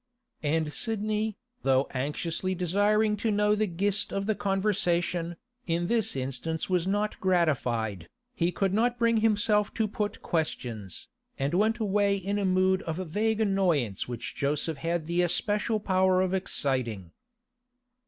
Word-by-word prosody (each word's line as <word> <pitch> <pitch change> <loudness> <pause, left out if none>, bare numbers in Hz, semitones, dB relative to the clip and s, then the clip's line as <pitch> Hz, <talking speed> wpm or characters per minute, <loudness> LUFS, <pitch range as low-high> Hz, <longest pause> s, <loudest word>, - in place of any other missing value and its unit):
And 155 0 0
Sidney, 215 -1 -1 0.2
though 135 0 +3
anxiously 160 +7 -2
desiring 205 +4 +2
to 225 +2 -1
know 210 0 +3
the 210 0 +1
gist 200 +3 +1
of 195 0 -2
the 220 - +2
conversation, 180 -4 0 0.3
in 170 +1 0
this 225 -2 0
instance 135 +5 -3
was 180 -1 +1
not 205 +2 -1
gratified. 125 - 0 0.2
He 175 -6 0
could 195 +2 0
not 240 +3 +2
bring 230 -1 +3
himself 210 -1 +2
to 220 - +1
put 210 0 -4
questions, 120 - -3 0.3
and 140 +3 -1
went 215 +5 +2
away 205 -2 +2
in 200 +2 -2
a 200 - 0
mood 185 0 +3
of 160 - -1
vague 210 +6 -1
annoyance 175 - +1
which 120 -2 -5
Joseph 150 +2 0
had 165 +2 -2
the 170 +2 +1
especial 210 +5 0
power 185 -2 +2
of 185 0 0
exciting. 130 - -1
185 Hz, 145 wpm, -28 LUFS, 160-210 Hz, 0.3 s, though